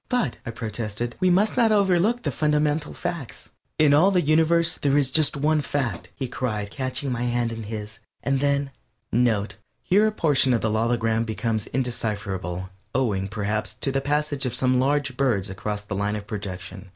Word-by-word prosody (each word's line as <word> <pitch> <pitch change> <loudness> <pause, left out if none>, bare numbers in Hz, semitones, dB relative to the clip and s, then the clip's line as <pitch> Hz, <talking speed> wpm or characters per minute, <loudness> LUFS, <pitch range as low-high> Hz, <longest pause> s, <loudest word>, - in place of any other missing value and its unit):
"But," 245 - 0
I - - -2
protested, 115 +1 -4
"we 185 -1 +3
must 200 +4 +3
not 235 -3 +4
overlook 200 +3 +3
the - - 0
fundamental 150 0 +1
facts." 160 -9 -6 0.3
"In 150 -2 +5
all 160 +7 +6
the 180 -3 +2
universe 165 +2 +3
there 140 0 +2
is 135 -3 +2
just 155 -1 +3
one 150 +2 +2
fact," 130 -11 -2
he 130 - -3
cried, 110 -5 -3
catching 130 0 -3
my 120 -1 -2
hand 120 -1 0
in 115 0 -5
his, 110 0 -6 0.2
and 135 -1 +1
then 140 0 +1 0.4
(NOTE: 110 -4 +1 0.3
_Here 210 +3 +6
a - - +1
portion 145 - +2
of 115 - 0
the 110 - 0
logogram 115 0 +1
becomes 110 -1 -2
indecipherable, 100 -7 -3 0.2
owing, 105 -7 +1
perhaps, 105 +1 -2
to 135 - -1
the 135 0 0
passage 145 -1 0
of 125 - -3
some 130 0 +2
large 135 0 +1
bird 120 -9 +1
across 105 +1 -4
the 105 0 -6
line 100 +1 -1
of 105 -1 -5
projection. 95 -2 -6
125 Hz, 180 wpm, -24 LUFS, 110-150 Hz, 0.4 s, all